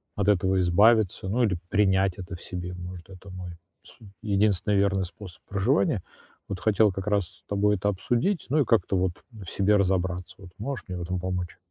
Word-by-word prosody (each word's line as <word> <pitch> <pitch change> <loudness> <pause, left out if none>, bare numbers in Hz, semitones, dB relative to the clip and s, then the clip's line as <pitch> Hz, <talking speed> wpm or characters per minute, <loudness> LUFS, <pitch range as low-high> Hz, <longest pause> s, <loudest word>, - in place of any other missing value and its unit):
от 100 -1 -1
этого 95 -1 +3
избавиться, 100 +2 +4
ну, 120 +5 +2
или 100 -6 +1
принять 95 -2 +2
это 90 -2 -7
в 85 - -12
себе. 90 0 -6
Может, 90 0 -9
это 95 +1 -12
мой 90 -1 -7 0.3
с - - -15 0.3
единственный 105 -1 +1
верный 100 -1 +2
способ 90 0 -11
проживания. 110 - +1 0.5
Вот 100 -2 -4
хотел 105 0 +3
как 95 +1 -6
раз 100 -2 +2
с - - -19
тобой 105 +1 +2
это 100 +3 0
обсудить, 120 - 0
ну, 150 +4 +2
и - - +1
как-то 100 -4 +2
вот 90 0 +1 0.2
в 110 -4 -11
себе 100 +4 +2
разобраться 95 -1 -1
вот. 95 -3 -12
Можешь 130 +5 -5
мне 90 -1 -5
в - - -5
этом 90 +2 -3
помочь? 90 -1 -3
95 Hz, 195 wpm, -26 LUFS, 90-105 Hz, 0.5 s, избавиться